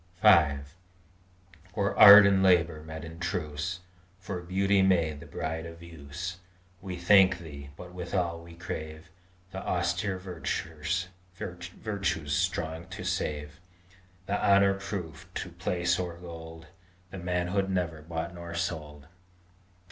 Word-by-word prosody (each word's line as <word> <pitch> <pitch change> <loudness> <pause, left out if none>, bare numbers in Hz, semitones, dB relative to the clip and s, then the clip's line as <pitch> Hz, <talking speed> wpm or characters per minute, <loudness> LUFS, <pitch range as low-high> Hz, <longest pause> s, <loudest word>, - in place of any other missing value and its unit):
V 85 -10 +6 1.2
For 100 -1 0
art 105 0 +11
and 100 -1 +4
labor 85 -4 +3
met 80 +1 -8
in 80 0 -10
truce, 85 +1 -3 0.4
For 95 -1 -5
beauty 95 +3 +2
made 85 -6 +2
the - - -11
bride 80 +2 -4
of 85 0 -11
use, 85 +3 -7 0.4
We 95 -1 -5
thank 95 +1 +5
Thee; 70 -5 -10
but, 90 0 -10
withal, 90 -1 -2
we 85 0 -13
crave 80 -1 -7 0.4
The 95 - -5
austere 90 +2 -1
virtues 85 -1 -3 1.3
strong 85 -3 -1
to - - -7
save, 75 0 -3 0.7
The 100 +2 -1
honor 100 0 +5
proof 90 -5 -6
to 90 - -4
place 90 0 0
or 90 -2 -4
gold, 80 -1 -10 0.5
The 95 - -7
manhood 90 +2 -1
never 85 -4 -1
bought 85 +2 -5
nor 85 -1 -8
sold! 75 -4 -4
85 Hz, 125 wpm, -29 LUFS, 80-95 Hz, 1.3 s, art